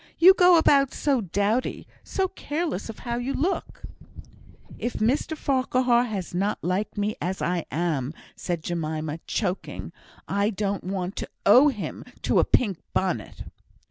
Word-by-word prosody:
You 370 +3 +9
go 360 -2 +6
about 275 -4 +4
so 275 -5 +1
dowdy 205 +6 -1 0.2
so 380 -1 -1
careless 300 - -3
of 225 - -7
how 235 0 -1
you 245 +3 -2
look." 350 +7 -2 1.0
"If 240 - -2
Mr 270 +8 0
Farquhar 255 -3 +2
has 200 -7 -5
not 195 +4 0
liked 185 +5 -1
me 205 +1 0
as 185 +2 -2
I 175 -1 -1
am," 155 -2 -1 0.2
said 170 -3 -3
Jemima, 160 -2 -3
choking, 195 -3 -3 0.4
"I 200 +1 +1
don't 200 -2 -2
want 185 0 -3
to - - -4 0.2
owe 250 +8 +8
him 245 -8 -3 0.2
to - - +3
a - - +5
pink 200 -9 +1 0.2
bonnet." 180 - -1
210 Hz, 145 wpm, -25 LUFS, 180-260 Hz, 1.0 s, You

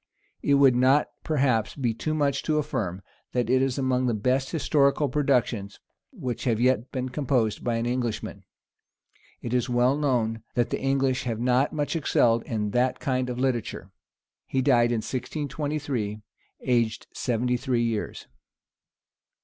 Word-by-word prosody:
It 140 - +3
would 135 -3 +5
not 130 +4 +4
perhaps 130 -8 +1
be 125 -5 0
too 155 +7 -2
much 140 -2 +1
to 155 -1 0
affirm, 100 - -2 0.3
that 125 -1 0
it 130 0 +4
is 135 0 0
among 130 -1 +1
the 120 - +1
best 130 +5 0
historical 145 -2 +2
productions 125 -7 0 0.3
which 135 - -5
have 115 -3 +1
yet 125 0 +1
been 130 -1 -3
composed 125 -5 0
by 120 -1 0
any 120 +1 0
Englishman. 120 -3 -3 1.0
It 120 - -3
is 125 +1 +1
well 125 +2 +3
known 120 -6 0
that 120 -1 +1
the - - -2
English 135 -1 +1
have 115 -3 -2
not 125 +3 +2
much 150 +1 -2
excelled 120 -7 +2
in 105 -3 -2
that 125 +3 +1
kind 130 -1 -1
of 125 - -4
literature. 120 -7 -2 0.6
He 130 -1 0
died 120 -3 +4
in 115 -2 0
1623, 140 -6 -3 0.4
aged 120 -3 0
seventy 125 0 0
three 120 -1 0
years. 115 -2 -3
125 Hz, 150 wpm, -26 LUFS, 120-140 Hz, 1.0 s, would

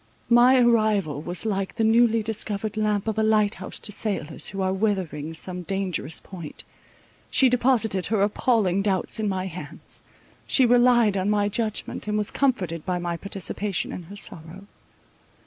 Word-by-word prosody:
My 245 +2 +6
arrival 215 - +2
was 175 +6 -5
like 195 -3 -2
the 225 - 0
newly 225 0 +4
discovered 215 -1 -2
lamp 210 -1 0
of 220 0 -1
a - - +3
lighthouse 210 -4 +1
to 210 - -4
sailors, 190 -8 -1
who 195 - -4
are 190 0 0
weathering 185 -7 -2
some 180 +2 -1
dangerous 180 -4 -2
point. 170 -6 -10 0.7
She 265 - +4
deposited 235 -6 +1
her 210 -2 +1
appalling 205 -3 +1
doubts 195 +1 0
in 215 -1 0
my 190 -1 -2
hands; 180 -1 -6 0.5
she 260 - +4
relied 240 -3 +4
on 190 +2 0
my 205 -1 +2
judgment, 215 0 -3
and 210 0 0
was 210 -1 -1
comforted 180 - 0
by 180 -1 -1
my 175 -1 -3
participation 200 +2 -3
in - - -6
her 200 - -9
sorrow. 185 -1 -5
205 Hz, 160 wpm, -24 LUFS, 185-220 Hz, 0.7 s, My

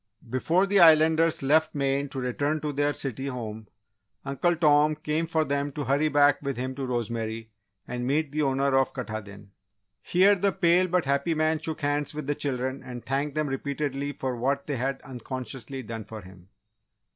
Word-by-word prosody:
Before 160 +10 +1
the 200 0 +3
Islanders 160 -1 +5
left 155 +3 +3
Maine 140 0 0
to 135 - -5
return 145 +5 -1
to 150 0 -3
their 145 +1 +1
city 135 -2 -3
home, 110 -4 -6 0.6
Uncle 170 +6 +1
Tom 150 -1 +4
came 155 +2 -2
for 160 -1 +1
them 140 0 -1
to 145 - -3
hurry 140 +3 +2
back 145 -1 +4
with 140 -3 -3
him 130 +1 -3
to 135 0 -4
Rosemary 115 -2 -3 0.4
and 125 0 -3
meet 145 +1 0
the 155 +1 -1
owner 135 -1 +1
of 135 0 +2
Katahdin. 105 -5 -7 0.5
Here, 190 +3 +4
the 200 0 +1
pale 180 -1 +3
but 180 -2 +1
happy 140 +4 +1
man 155 0 +1
shook 160 0 -5
hands 145 +1 -1
with 150 -2 -4
the 145 - 0
children 130 -2 -2
and 125 -1 -9
thanked 140 +2 -1
them 155 0 0
repeatedly 140 +1 -3
for 130 -2 -3
what 135 +4 -1
they 145 -3 -3
had 135 +2 -2
unconsciously 130 0 -6
done 115 -1 -6
for 110 0 -8
him. 95 -1 -15
140 Hz, 180 wpm, -27 LUFS, 130-155 Hz, 0.6 s, Islanders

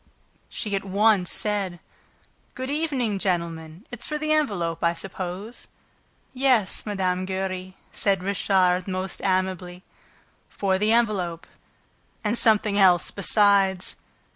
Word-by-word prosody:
She 210 -3 -3
at 195 - -2
once 200 -1 +3
said: 200 -4 0 0.8
"Good 260 +1 -4
evening, 270 -9 -1
gentlemen! 170 0 -3
It's 245 -1 -6
for 300 - -2
the 310 0 -2
envelope, 180 - 0
I 170 0 +2
suppose?" 190 +5 -7 0.7
"Yes, 250 -7 +1
Mme. 185 -2 -1
Giry," 185 -1 -4 0.2
said 195 -2 0
Richard, 185 -2 +1
most 185 0 -4
amiably. 185 -1 -1 0.7
"For 190 -1 0
the 210 +2 +2
envelope... 200 -8 0 0.8
and 210 +1 0
something 215 -3 +3
else 180 -3 +5
besides." 200 -2 +2
195 Hz, 115 wpm, -24 LUFS, 180-215 Hz, 0.8 s, else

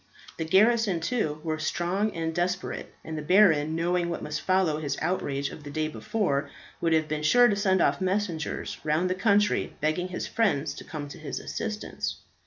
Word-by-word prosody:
The 160 - -2
garrison, 210 +1 +4
too, 165 -6 -1
were 155 -1 -2
strong 180 +6 0
and 165 -1 -2
desperate; 180 +2 -2
and 160 - -5
the 155 - -3
baron, 160 -3 +4
knowing 170 +1 0
what 170 - -4
must 150 0 -3
follow 185 -5 +2
his 145 -3 -2
outrage 140 -5 -1
of 150 - -10
the 145 - -8
day 155 +1 -1
before, 150 -4 -1 0.3
would 165 - +1
have 160 -1 +3
been 155 0 -2
sure 245 +11 +6
to 210 - +2
send 190 -2 +2
off - - +1
messengers 185 -4 -2
round 160 +4 +1
the - - +3
country 205 +2 +2
begging 155 +4 0
his 180 - -4
friends 155 -10 +1
to - - -9
come 150 -2 -6
to - - -10
his 155 - -5
assistance. 215 -2 -4
170 Hz, 190 wpm, -27 LUFS, 155-195 Hz, 0.3 s, sure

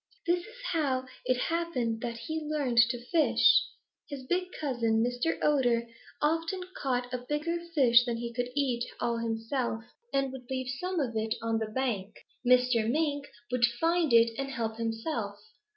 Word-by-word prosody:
This 345 +1 +3
is 430 +7 -12 0.2
how 270 -6 0 0.2
it 255 - +2
happens 255 -7 -1
that 235 -1 -4
he 315 +6 -4
learned 295 -6 0
to 245 - -1
like 240 +1 -14
fish. 325 -3 +5 0.4
His 280 -2 -6
big 360 +6 +1
cousin, 235 -6 +1
Mr. 245 +6 0
Otter, 245 -5 +3 0.4
often 330 +4 +1
caught 250 -2 -2
a 250 - -1
bigger 320 +3 -1 0.2
fish 245 -4 +6
than 235 -2 -1
he 235 0 -5
could 245 +1 -2
eat 255 -5 +1 0.2
all 235 -1 0
himself 225 +1 -2 0.3
and 275 -1 +1
would 255 -2 -10
leave 260 -1 -2
some 365 -1 -2
of 250 -6 -1
it 220 0 0
on 225 0 +1
the 220 -1 -3
bank. 215 -5 -2 0.3
Mr. 250 -2 +4
Mink 285 0 0 0.2
would 250 -1 +4
find 330 -2 +2
it 230 0 +6
and 275 0 -2
help 225 -4 -3
himself. 225 -1 -2
250 Hz, 170 wpm, -30 LUFS, 235-295 Hz, 0.4 s, fish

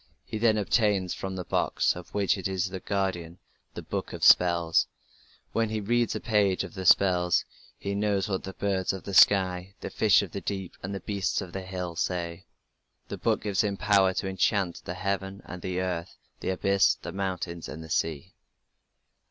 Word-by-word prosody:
He 110 - -5
then 110 -1 +3
obtains 100 -3 +1
from 95 0 -5
the 90 - -4
box, - - +1
of 90 0 -9
which 100 -2 +2
it 95 - -3
is 95 0 -2
the 95 - -4
guardian, 90 -4 -2 0.4
the - - -6
book - - -4
of - - -6
spells; 85 -2 +5 0.6
when 115 -1 0
he 110 0 -2
reads 120 +3 +1
a - - -2
page 105 -5 +2
of - - -8
the 95 -3 -3
spells 90 -2 +4 0.3
he 100 - -4
knows 100 -1 0
what 95 -2 -2
the 95 - -6
birds 95 -2 0
of 95 - -7
the 100 - -6
sky, 95 0 +4
the - - -6
fish 105 -2 +4
of 95 - -7
the 100 - -5
deep, 95 -3 -4
and 100 +2 -4
the 95 - -5
beasts 100 -3 -1
of 95 -3 -7
the 95 - -4
hill 90 -2 -5
say; 85 +1 -3 0.6
the - - -4
book - - 0
gives 105 +1 +1
him 100 -2 -1
power 100 -2 +4
to 95 - -2
enchant 95 -1 0
"the 90 - -4
heaven 100 0 -3
and 90 -1 -8
the 90 0 -2
earth, 90 -1 -3 0.2
the - - -3
abyss, 100 +1 +3
the - - -8
mountains 90 -3 -4
and 80 +1 -7
the 80 - -11
sea". 80 +2 -1
95 Hz, 195 wpm, -27 LUFS, 90-100 Hz, 0.6 s, spells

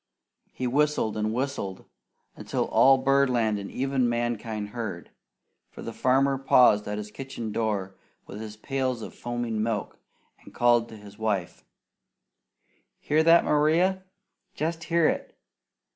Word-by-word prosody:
He 130 - -5
whistled 145 -3 +1
and 110 0 -1
whistled 125 -6 -3 0.5
until - - -2
all 135 0 +6
birdland 130 -5 +2
and 100 - -7
even 130 -2 0
mankind 115 -3 -2
heard, 105 -6 -6 0.6
for - - -11
the 115 - -6
farmer 135 +2 +2
paused 125 -6 +4
at 105 0 -3
his 105 0 -6
kitchen 130 -3 -6
door, 105 -4 -2 0.3
with 105 +2 -9
his 110 -1 -8
pails 130 -1 -2
of - - -8
foaming 120 -2 -3
milk, 110 -2 -3 0.4
and - - -16
called 120 -1 +3
to 110 - -10
his 105 0 -14
wife: 100 -6 -2 1.4
"Hear 155 +2 +2
that, 165 +1 +5
Maria! 170 +6 +2 0.5
Jest 160 +1 -3
hear 170 -1 +3
it! - - -3
120 Hz, 135 wpm, -26 LUFS, 110-135 Hz, 1.4 s, all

